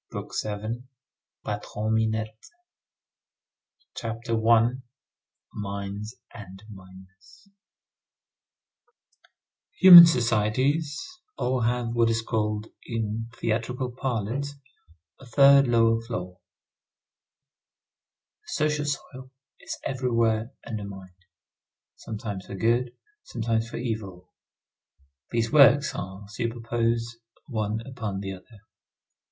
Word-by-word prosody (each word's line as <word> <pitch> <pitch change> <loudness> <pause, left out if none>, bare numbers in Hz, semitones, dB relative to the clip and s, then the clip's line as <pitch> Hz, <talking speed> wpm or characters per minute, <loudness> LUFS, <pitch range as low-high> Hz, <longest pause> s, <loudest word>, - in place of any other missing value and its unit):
BOOK - - -7
SEVENTH—PATRON 110 -1 -5
MINETTE 110 0 -2 1.5
CHAPTER 115 +1 -5 0.2
I—MINES 110 -4 -3 0.2
AND 100 -3 -11
MINERS 95 - -16 2.3
Human 175 -2 +12
societies 130 +4 +1 0.4
all 125 0 0
have 120 0 0
what 115 -1 +3
is 115 0 0
called 105 -2 -2 0.2
in 115 -1 -4
theatrical 125 +3 -2
parlance, 130 +3 -3 0.6
a 135 - -14
third 140 +2 +6
lower 115 -1 +3
floor. 90 -6 -6 2.1
The - - -6
social 150 -1 0
soil 130 -2 -5 0.3
is - - -7
everywhere 115 -4 0 0.2
undermined, 100 -4 -7 0.8
sometimes 105 -3 -7
for - - -7
good, 120 +4 +1 0.3
sometimes 115 -1 -2
for - - -6
evil. 110 -7 -5 1.0
These 115 -1 -1
works 145 0 +6
are 95 +2 -7
superposed 115 +1 -2 0.3
one 110 -3 -3
upon 110 -7 -5
the 95 -1 -5
other. 105 +3 -15
115 Hz, 85 wpm, -26 LUFS, 105-125 Hz, 2.3 s, Human